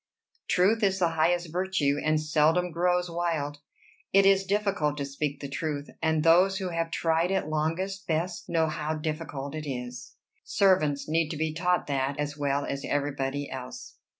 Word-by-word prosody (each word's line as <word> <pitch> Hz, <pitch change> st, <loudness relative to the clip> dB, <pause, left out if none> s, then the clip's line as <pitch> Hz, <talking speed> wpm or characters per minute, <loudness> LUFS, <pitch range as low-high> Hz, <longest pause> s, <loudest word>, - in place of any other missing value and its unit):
Truth 200 Hz, +6 st, +3 dB
is 195 Hz, -2 st, +2 dB
the 175 Hz, -3 st, +2 dB
highest 170 Hz, +1 st, +1 dB
virtue, 175 Hz, -5 st, 0 dB
and 155 Hz, 0 st, +2 dB
seldom 155 Hz, +3 st, +2 dB
grows 180 Hz, +2 st, +1 dB
wild. 165 Hz, -4 st, -2 dB, 0.5 s
It 195 Hz, 0 st, +5 dB
is 195 Hz, 0 st, +4 dB
difficult 200 Hz, -8 st, 0 dB
to 140 Hz, -, -2 dB
speak 140 Hz, +1 st, -3 dB
the 140 Hz, -, -4 dB
truth, 145 Hz, 0 st, -4 dB
and 160 Hz, -1 st, +1 dB
those 180 Hz, +4 st, +5 dB
who 190 Hz, -2 st, -3 dB
have 165 Hz, -1 st, -2 dB
tried 165 Hz, +1 st, +1 dB
it 190 Hz, -5 st, 0 dB
longest 170 Hz, +6 st, -2 dB
best 170 Hz, +2 st, -2 dB
know 165 Hz, -1 st, +2 dB
how 155 Hz, 0 st, -2 dB
difficult 150 Hz, -3 st, -4 dB
it 155 Hz, -2 st, -5 dB
is. 125 Hz, -1 st, -6 dB, 0.3 s
Servants 170 Hz, -8 st, +2 dB
need 160 Hz, 0 st, +1 dB
to 155 Hz, -, -4 dB
be 160 Hz, 0 st, -1 dB
taught 180 Hz, +2 st, +1 dB
that 140 Hz, 0 st, -1 dB
as 145 Hz, 0 st, -2 dB
well 140 Hz, -1 st, 0 dB
as 140 Hz, 0 st, -4 dB
everybody 145 Hz, -1 st, -2 dB
else." 130 Hz, -1 st, -8 dB
160 Hz, 170 wpm, -28 LUFS, 145-180 Hz, 0.5 s, It